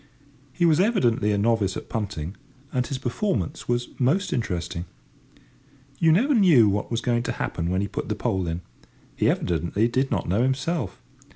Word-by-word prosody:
He 175 - +1
was 160 -1 +4
evidently 120 - +2
a 100 - +1
novice 105 -2 +1
at - - -8
punting, 100 -5 -4 0.4
and 125 -1 0
his 135 - -3
performance 125 - -2
was 120 0 0
most 150 +11 +1
interesting. 90 -7 -3 1.1
You 165 -1 +5
never 245 - +3
knew 170 - +6
what 100 0 -1
was 115 -1 -1
going 120 -1 +1
to - - -3
happen 85 0 -3
when 95 +1 0
he 100 - -1
put - - -5
the - - 0
pole 95 -2 -1
in; 85 +1 -3 0.5
he - - +2
evidently 85 +6 0
did 130 +3 0
not - - -1
know 95 +7 +2
himself. 135 - -1
115 Hz, 175 wpm, -25 LUFS, 95-140 Hz, 1.1 s, knew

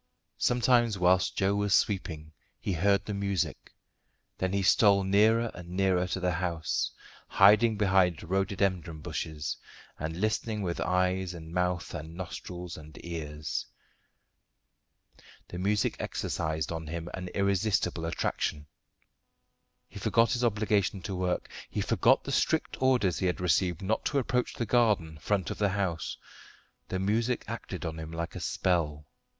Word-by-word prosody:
Sometimes 120 -3 +3
whilst 90 0 +3
Joe 95 +1 +2
was 100 -1 +2
sweeping 80 -6 -1 0.3
he 95 - -2
heard 100 +4 +2
the 105 - -3
music; 100 -3 -2 0.7
then 95 0 0
he 100 0 0
stole 100 0 +5
nearer 110 +4 +3
and 90 -1 -10
nearer 90 -1 +1
to 95 - -2
the 90 -1 +1
house, 85 -2 -1 0.4
hiding 105 +3 +5
behind 95 -5 +3
rhododendron 95 -3 -1
bushes, 75 -1 -4 0.4
and 80 +3 -4
listening 110 0 -1
with 85 -2 -2
eyes 90 0 0
and 80 0 -9
mouth 90 0 -1
and 80 0 -7
nostrils 90 -1 -6
and 75 0 -12
ears. 75 -3 -4 1.8
The 90 - -6
music 105 +3 +1
exercised 80 0 -2
on 80 -1 -4
him 85 +1 -5
an 90 -1 -5
irresistible 100 -3 +1
attraction. 75 -2 -2 1.2
He - - -10
forgot 115 -1 +3
his 125 0 0
obligation 105 -4 +1
to 95 - -4
work; 90 0 -1 0.2
he - - -3
forgot - - +3
the - - -4
strict - - +1
orders 125 -9 +3
he 95 - +1
had 90 - -1
received 90 -1 +1
not 110 +4 0
to 145 - 0
approach 125 -2 0
the 120 - -2
garden 105 -11 +2
front 95 0 -1
of - - -6
the 105 -1 +3
house. 95 -5 -2 0.7
The 95 - -2
music 110 +6 0
acted - - -5
on 80 0 -4
him 80 0 -7
like 85 0 -4
a - - -4
spell. 75 -5 0
95 Hz, 145 wpm, -29 LUFS, 85-100 Hz, 1.8 s, stole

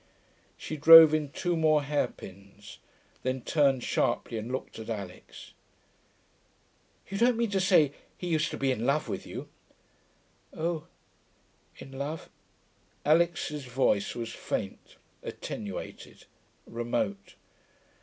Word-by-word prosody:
She 155 - -6
drove 160 +1 +10
in 155 -2 0
two 175 +4 -2
more 155 -2 +3
hairpins, 100 -8 -5 0.4
then 130 0 -2
turned 135 -3 +2
sharply 115 - -1
and 110 +3 -6
looked 130 -3 -5
at 110 - -8
Alix. 100 -5 -8 1.5
'You 195 +1 -4
don't 240 0 +3
mean 230 -3 0
to 195 - +1
say 170 -7 +4 0.2
he - - -7
used 160 -1 +1
to - - -6
be 135 -1 +1
in 115 -3 -2
love 140 +5 +1
with - - -5
you.' - - -7 1.1
'Oh... 165 -1 -3 0.9
in 135 - -11
love....' 140 +4 -6 0.7
Alix's 155 -2 +1
voice 125 -5 0
was 115 -1 -5
faint, - - -5 0.3
attenuated, 100 -3 -7 0.4
remote. 115 -4 -3
140 Hz, 115 wpm, -28 LUFS, 115-160 Hz, 1.5 s, drove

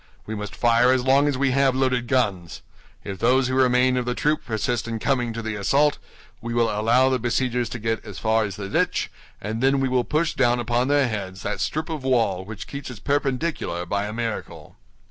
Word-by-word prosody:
We 110 - -5
must 105 -2 -6
fire 120 +1 +4
as 130 -1 +2
long 135 +2 +4
as 140 -3 0
we 135 0 +1
have 135 0 +2
loaded 130 -2 0
guns. 100 -11 -1 0.4
If 95 -2 -6
those 130 +3 +3
who - - -2
remain 130 0 +3
of 125 - -1
the 125 0 -2
troop 150 +4 0
persist 115 0 -2
in 115 -1 -3
coming 120 0 0
to 115 0 -5
the 110 0 -3
assault, 140 +9 +2 0.4
we 115 +1 -4
will 115 -1 +2
allow 115 +5 +3
the 130 -1 +1
besiegers 120 0 0
to - - -5
get 115 0 -2
as 105 -5 -9
far 110 +2 +1
as 100 - -5
the 100 -1 -6
ditch, - - 0 0.3
and 110 +3 -4
then 135 +1 +3
we 135 - +1
will 125 -1 +1
push 155 +4 0
down 120 -2 +2
upon 120 +2 0
their 145 -2 +3
heads 95 -4 -5
that 105 - -3
strip 155 +1 -2
of 155 -4 -5
wall 115 -8 +1
which 105 +1 -8
keeps 140 -1 -7
its 125 -4 -9
perpendicular 140 - -1
by 100 +3 -2
a - - -5
miracle." 115 0 -5
120 Hz, 220 wpm, -23 LUFS, 110-130 Hz, 0.4 s, fire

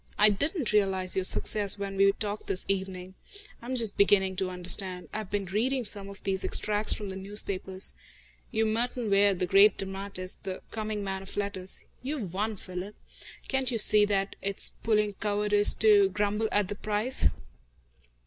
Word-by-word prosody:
I 210 0 +6
didn't 285 - -1
realise 190 -3 +1
your 190 - 0
success 205 +1 +4
when 200 -1 -5
we 195 0 +4
talked 210 0 -5
this 190 -1 -1
evening. 190 -1 -3 0.5
I 235 - -11
am 260 - -2
just 225 -4 +4
beginning 190 -1 +3
to 190 -1 -1
understand. 180 0 +2
I've 215 -3 -5
been 205 -1 -2
reading 240 +7 -1
some 200 -1 -6
of 200 - -12
these 190 -1 -1
extracts 210 0 +1
from 205 -2 -2
the 190 - -6
newspapers. 190 -1 -2 0.6
You're 220 0 0
Merton 230 0 -2
Ware, 200 0 +4
the 180 - -1
great 195 +3 +5
dramatist, 195 -1 -5
the 190 -2 -6
coming 215 -2 -4
man 190 -1 -4
of 195 - -9
letters. 200 -2 -4 0.2
You've 255 - -5
won, 210 +2 -2
Philip. 185 +3 -8 0.5
Can't 265 -2 -1
you 240 - -1
see 210 -1 +5
that 200 -1 -1
it's 200 0 -1
puling 210 -2 +1
cowardice 205 0 +2
to 205 -3 +5
grumble 205 +3 -1
at 205 -2 +1
the 205 - -3
price?" 215 +5 0
200 Hz, 170 wpm, -28 LUFS, 190-215 Hz, 0.6 s, I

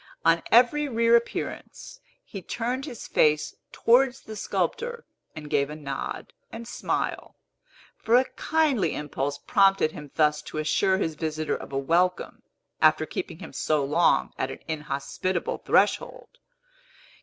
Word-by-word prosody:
On 165 0 +4
every 265 +5 +4
reappearance, 230 0 0 0.2
he 195 - -8
turned 245 +8 -3
his 245 -7 -8
face 150 -1 +2 0.2
towards 255 +2 +3
the 220 - -9
sculptor 475 - -2 0.3
and 150 -1 -8
gave 140 -1 +1
a 150 - -6
nod 140 -3 -6 0.2
and 230 0 -8
smile; - - -3 0.6
for 230 - +2
a 255 +1 +5
kindly 285 - 0
impulse 145 -1 -3
prompted 195 -2 +3
him 150 -2 -10
thus 150 -1 +2
to - - -8
assure 190 +5 +2
his 165 -4 -1
visitor 155 0 -2
of - - -9
a 135 - -2
welcome, 170 +6 0 0.4
after - - +4
keeping - - -5
him - - -10
so 150 -3 0
long 160 +5 +2
at 130 - -1
an - - -8
inhospitable 150 +3 -3
threshold. - - 0
175 Hz, 135 wpm, -26 LUFS, 150-235 Hz, 0.6 s, a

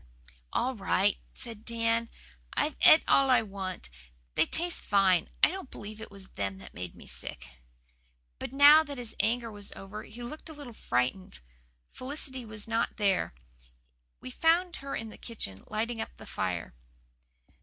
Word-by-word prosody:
"All 260 +2 +1
right," 200 -2 +2 0.2
said 225 -3 -6
Dan. 230 0 +1 0.5
"I've 305 - +1
et 315 - +9
all 275 -1 +5
I 245 -3 +6
want. 190 - -6 0.4
They - - +3
taste 345 +1 0
fine. 190 -4 +3
I - - +7
don't 380 -7 -6
believe 215 +1 -9
it 220 - -7
was 195 -1 -8
them 95 -1 -3
made 90 -1 -6
me - - -13
sick." - - -6 0.9
But - - -5
now 290 +3 +9
that 285 -2 -7
his 240 -3 -3
anger 230 0 +1
was 205 -1 -9
over 200 +2 -7
he 240 +3 -10
looked 305 +7 -7
a - - -7
little 285 -5 -9
frightened. 125 - -1 0.5
Felicity 260 -1 -5
was 215 -1 -6
not 230 +1 0
there. 195 - +1 0.8
We 125 - -8
found 340 - +3
her 275 0 -5
in 225 0 -4
the - - -12
kitchen, 100 - -4
lighting 225 +1 -2
up - - -7
the - - -11
fire. 90 -6 -3
225 Hz, 160 wpm, -30 LUFS, 195-265 Hz, 0.9 s, et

